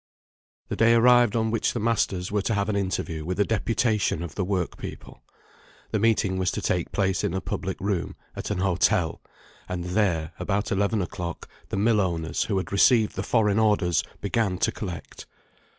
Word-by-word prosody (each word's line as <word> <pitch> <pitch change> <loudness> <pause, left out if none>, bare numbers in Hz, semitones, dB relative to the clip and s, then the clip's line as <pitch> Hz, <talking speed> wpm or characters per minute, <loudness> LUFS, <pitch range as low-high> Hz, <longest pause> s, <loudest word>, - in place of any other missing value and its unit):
The - - -2
day 115 +1 +5
arrived 120 -1 +5
on 110 -1 +1
which 115 - 0
the 120 - -2
masters 100 -5 0
were 105 0 +1
to 110 +3 -1
have 100 +1 0
an 105 - 0
interview 95 -5 -2
with 90 +4 -3
a 100 - +4
deputation 110 -5 0
of 85 - -6
the 100 - -2
work 90 -2 -2
people. - - -9 0.7
The 110 - +1
meeting 100 -4 +2
was 90 -1 +1
to - - -2
take 90 -2 -1
place 95 -2 0
in 90 - -1
a - - 0
public 95 0 -4
room, 100 -3 -2 0.2
at - - -5
an 105 - -1
hotel; 90 -1 +1 0.5
and 90 -1 -3
there, 90 -4 0
about 100 +3 -1
eleven 100 +1 +1
o'clock, 85 -1 -6 0.2
the - - -2
mill 105 +1 +3
owners, 85 -3 -1
who 100 - -1
had 95 - -3
received 110 +2 +4
the 95 - -2
foreign 105 -1 +2
orders, 105 -6 +2 0.2
began 100 -2 0
to - - +1
collect. 90 -5 -7
100 Hz, 185 wpm, -25 LUFS, 90-110 Hz, 0.7 s, day